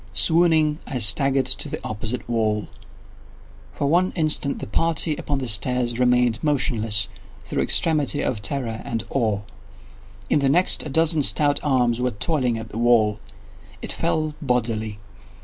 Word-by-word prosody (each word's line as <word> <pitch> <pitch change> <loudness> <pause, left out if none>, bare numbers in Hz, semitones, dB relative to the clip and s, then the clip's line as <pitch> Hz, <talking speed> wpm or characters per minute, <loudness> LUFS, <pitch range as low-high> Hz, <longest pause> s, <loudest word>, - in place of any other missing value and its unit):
Swooning, 160 - +3
I 130 - -4
staggered 135 +4 +2
to 130 +3 -1
the - - -5
opposite 110 +3 -4
wall. 110 -3 -1 1.1
For 145 - -2
one 175 +6 +2
instant 155 -4 +1
the - - -6
party 160 - -1
upon 145 -1 -3
the 130 -2 -4
stairs 120 +3 +3
remained 125 -2 +2
motionless, 115 -8 +1 0.4
through - - -2
extremity 150 -3 +1
of 110 -5 -2
terror 115 0 -3
and 115 -1 -4
of - - -20
awe. 110 -6 0 0.9
In 150 - +2
the 140 -1 +1
next, 180 +6 +2
a - - -6
dozen 160 +2 +3
stout 145 +1 +3
arms 125 -4 +1
were 125 - +1
toiling 125 +1 -1
at 110 -1 -8
the 110 - -6
wall. 110 -3 +2 0.6
It - - -4
fell 155 -1 -1
bodily. 115 -5 -2
125 Hz, 150 wpm, -22 LUFS, 115-150 Hz, 1.1 s, Swooning